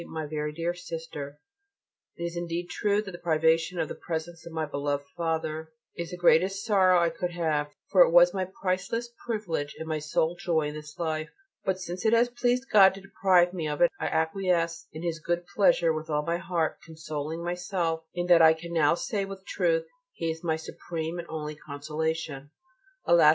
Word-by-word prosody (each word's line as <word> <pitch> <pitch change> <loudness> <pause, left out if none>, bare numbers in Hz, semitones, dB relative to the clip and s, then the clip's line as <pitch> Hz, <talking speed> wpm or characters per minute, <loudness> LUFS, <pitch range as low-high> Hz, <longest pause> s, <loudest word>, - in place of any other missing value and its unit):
MY 160 -1 -4
VERY 150 0 -3
DEAR 170 +2 -1
SISTER, 165 -5 -7 0.8
It 170 - -5
is 170 0 -3
indeed 175 +1 -3
true 205 0 +1
that 195 - -7
the 175 - -9
privation 165 +1 +2
of 160 - 0
the - - -5
presence 165 0 -5
of - - -8
my 160 -1 -1
beloved 145 -1 -2
Father 160 -1 -2 0.2
is 170 -1 -4
the 180 - -6
greatest 190 +4 +3
sorrow 190 -4 +5
I 170 -1 +2
could 175 +2 -3
have: 155 -4 0 0.2
for 190 -3 +6
it - - +8
was 175 +1 +6
my 190 -1 -1 0.2
priceless 195 +6 -1 0.2
privilege 180 -10 -2
and 160 - -6
my 155 -1 -1
sole 160 +2 0
joy 165 -4 0
in - - -7
this 150 0 -9
life. 155 -1 -2 0.4
But 190 -1 0
since 180 0 -5
it 220 - +3
has 235 +1 +4
pleased 245 +1 0
God 195 -2 +8
to 195 - -10
deprive 185 -2 +3
me 165 -4 -2
of 150 -1 -3
it 175 - +5
I - - -1
acquiesce 170 +1 0
in 155 +2 -8
His 165 -1 -2
good 175 +2 -1
pleasure 170 -5 +4
with 155 +1 -5
all 150 -1 0
my 170 0 0
heart, 175 -3 -1
consoling 155 0 -5
myself 175 -2 -1
in 175 0 -1
that 175 -2 +6
I 160 0 +8
can 170 +1 -8
now 155 -1 +4
say 200 +3 -2
with 195 0 -9
truth: - - +1 0.3
"He 165 -1 -2
is 160 +1 -8
my 160 -2 +1
supreme 160 +1 -5
and 170 - -6
only 155 -1 -4
consolation." 150 0 -4 0.6
Alas! - - +7
170 Hz, 200 wpm, -28 LUFS, 160-180 Hz, 0.8 s, it